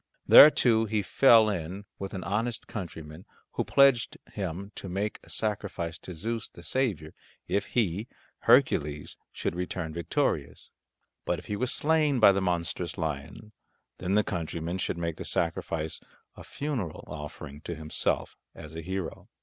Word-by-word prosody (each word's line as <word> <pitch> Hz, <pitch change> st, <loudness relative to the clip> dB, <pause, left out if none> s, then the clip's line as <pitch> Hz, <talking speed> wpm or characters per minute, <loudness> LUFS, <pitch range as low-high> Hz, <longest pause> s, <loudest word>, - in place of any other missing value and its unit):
There 150 Hz, -, +11 dB
too 115 Hz, -6 st, +3 dB
he 105 Hz, -1 st, 0 dB
fell 115 Hz, +1 st, +6 dB
in 95 Hz, 0 st, -3 dB
with 95 Hz, 0 st, -5 dB
an 95 Hz, -, -4 dB
honest 110 Hz, +4 st, -2 dB
countryman 80 Hz, -4 st, -7 dB, 0.3 s
who -, -, -1 dB
pledged 135 Hz, -4 st, +4 dB, 0.2 s
him 95 Hz, 0 st, -4 dB
to 95 Hz, -, -7 dB
make 100 Hz, +4 st, -2 dB
a -, -, -18 dB
sacrifice 95 Hz, -6 st, -3 dB
to 90 Hz, -, -9 dB
Zeus, 115 Hz, +7 st, -3 dB
the 85 Hz, -, -14 dB
saviour, 90 Hz, -, -1 dB, 0.3 s
if 100 Hz, -, 0 dB
he, 105 Hz, -2 st, -1 dB, 0.3 s
Hercules, 75 Hz, 0 st, +3 dB, 0.2 s
should -, -, -3 dB
return 90 Hz, -2 st, -4 dB
victorious; 85 Hz, -, -2 dB, 0.5 s
but -, -, -1 dB
if -, -, -10 dB
he 105 Hz, -, -3 dB
were 125 Hz, +5 st, -1 dB
slain 150 Hz, -1 st, +2 dB
by 105 Hz, -3 st, +8 dB
the 95 Hz, 0 st, 0 dB
monstrous 85 Hz, -1 st, -2 dB
lion, 80 Hz, +7 st, -5 dB, 0.5 s
then 95 Hz, +2 st, 0 dB
the 105 Hz, -, +4 dB
countryman 85 Hz, 0 st, -3 dB
should -, -, -2 dB
make 85 Hz, -1 st, -3 dB
the -, -, -5 dB
sacrifice 80 Hz, -1 st, -1 dB, 0.3 s
a -, -, -11 dB
funeral 130 Hz, -, -4 dB
offering 75 Hz, -1 st, -8 dB
to 85 Hz, -, -5 dB
himself 80 Hz, 0 st, -1 dB, 0.2 s
as 75 Hz, 0 st, -10 dB
a 80 Hz, -, -5 dB
hero. 95 Hz, -1 st, -5 dB
95 Hz, 155 wpm, -28 LUFS, 80-110 Hz, 0.5 s, There